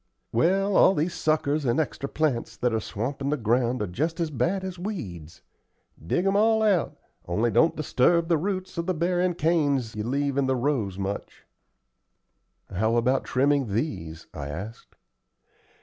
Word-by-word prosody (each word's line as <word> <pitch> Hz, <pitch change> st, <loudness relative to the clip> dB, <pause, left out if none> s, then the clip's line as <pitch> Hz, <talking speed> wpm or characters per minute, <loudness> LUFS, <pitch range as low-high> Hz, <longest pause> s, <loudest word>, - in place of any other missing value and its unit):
"Well, 190 Hz, -, +2 dB
all 190 Hz, -, +6 dB
these 165 Hz, +4 st, 0 dB
suckers 155 Hz, -1 st, 0 dB
and 120 Hz, +2 st, +1 dB
extra 140 Hz, -2 st, -2 dB
plants 150 Hz, -7 st, -1 dB
that 125 Hz, -1 st, 0 dB
are 110 Hz, -, +1 dB
swampin' 135 Hz, +7 st, -3 dB
the 150 Hz, -, +1 dB
ground 120 Hz, 0 st, +1 dB
are -, -, 0 dB
just 155 Hz, -, -2 dB
as 165 Hz, -2 st, -1 dB
bad 150 Hz, -, 0 dB
as 185 Hz, -2 st, -6 dB
weeds. 95 Hz, -, -6 dB, 0.6 s
Dig 175 Hz, -, 0 dB
'em 195 Hz, 0 st, +2 dB
all 220 Hz, +1 st, +4 dB
out, 195 Hz, -7 st, +1 dB, 0.3 s
only 110 Hz, +7 st, +1 dB
don't 165 Hz, -, +3 dB
disturb 160 Hz, +3 st, +2 dB
the 165 Hz, -3 st, +2 dB
roots 185 Hz, 0 st, -3 dB
of 170 Hz, -, -3 dB
the 185 Hz, -, 0 dB
bearin' 175 Hz, +2 st, +1 dB
canes 145 Hz, -8 st, +1 dB
you 105 Hz, -, -3 dB
leave 140 Hz, +3 st, -1 dB
in 135 Hz, -, +1 dB
the 130 Hz, -, +2 dB
rows 120 Hz, -8 st, -1 dB
much." 100 Hz, +1 st, -5 dB, 1.3 s
"How 110 Hz, +5 st, +1 dB
about 125 Hz, +3 st, +2 dB
trimming 135 Hz, -5 st, +1 dB
these?" 85 Hz, -, -3 dB
I 70 Hz, -, -5 dB
asked. 95 Hz, +10 st, -8 dB
140 Hz, 165 wpm, -26 LUFS, 115-170 Hz, 1.3 s, all